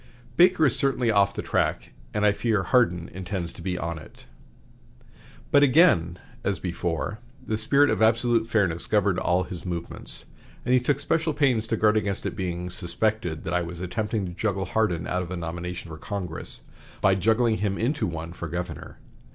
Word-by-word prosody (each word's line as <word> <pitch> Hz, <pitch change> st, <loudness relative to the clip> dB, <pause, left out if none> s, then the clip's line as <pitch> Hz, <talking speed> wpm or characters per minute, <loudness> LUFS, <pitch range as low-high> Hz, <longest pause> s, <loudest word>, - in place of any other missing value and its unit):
Baker 180 Hz, -2 st, +5 dB
is 130 Hz, -, +4 dB
certainly 125 Hz, -4 st, +1 dB
off 100 Hz, -1 st, +3 dB
the -, -, -3 dB
track, -, -, -1 dB, 0.2 s
and 105 Hz, 0 st, 0 dB
I 105 Hz, -, +6 dB
fear 105 Hz, -1 st, 0 dB
Hardin 90 Hz, -10 st, +2 dB
intends 90 Hz, -2 st, -4 dB
to -, -, -11 dB
be 90 Hz, -1 st, -2 dB
on 85 Hz, -2 st, -3 dB
it." -, -, -15 dB, 1.3 s
But 145 Hz, -, +6 dB
again, 130 Hz, -, +4 dB, 0.3 s
as 100 Hz, -3 st, 0 dB
before, 85 Hz, +4 st, -3 dB, 0.3 s
the 110 Hz, -, -1 dB
spirit 140 Hz, +7 st, +3 dB
of -, -, -1 dB
absolute 115 Hz, 0 st, +3 dB
fairness 95 Hz, -7 st, +1 dB
governed 100 Hz, -3 st, +2 dB
all 90 Hz, +1 st, +1 dB
his 90 Hz, -1 st, -7 dB
movements, 85 Hz, -2 st, -6 dB, 0.4 s
and 125 Hz, -, +2 dB
he 130 Hz, -, +6 dB
took 140 Hz, +3 st, 0 dB
special 160 Hz, +1 st, 0 dB
pains 130 Hz, -7 st, +2 dB
to 115 Hz, -, 0 dB
guard 105 Hz, 0 st, +3 dB
against 100 Hz, -2 st, -2 dB
it -, -, -3 dB
being 90 Hz, -1 st, -3 dB
"suspected 90 Hz, -2 st, -1 dB
that 85 Hz, -, -3 dB
I 90 Hz, -, +2 dB
was 85 Hz, 0 st, -6 dB
attempting 105 Hz, +3 st, -2 dB
to 90 Hz, -, -5 dB
juggle 95 Hz, 0 st, -1 dB
Hardin 90 Hz, -4 st, 0 dB
out 90 Hz, -, -1 dB
of 90 Hz, -, -6 dB
a 95 Hz, -, -4 dB
nomination 85 Hz, +1 st, -5 dB
for 80 Hz, -1 st, -8 dB
Congress 95 Hz, -5 st, -2 dB, 0.4 s
by 95 Hz, -, +4 dB
juggling 110 Hz, +4 st, +2 dB
him 100 Hz, -1 st, -1 dB
into 140 Hz, +7 st, 0 dB
one 85 Hz, 0 st, -5 dB
for 85 Hz, -, -6 dB
governor." 85 Hz, -1 st, -6 dB
100 Hz, 185 wpm, -25 LUFS, 85-115 Hz, 1.3 s, I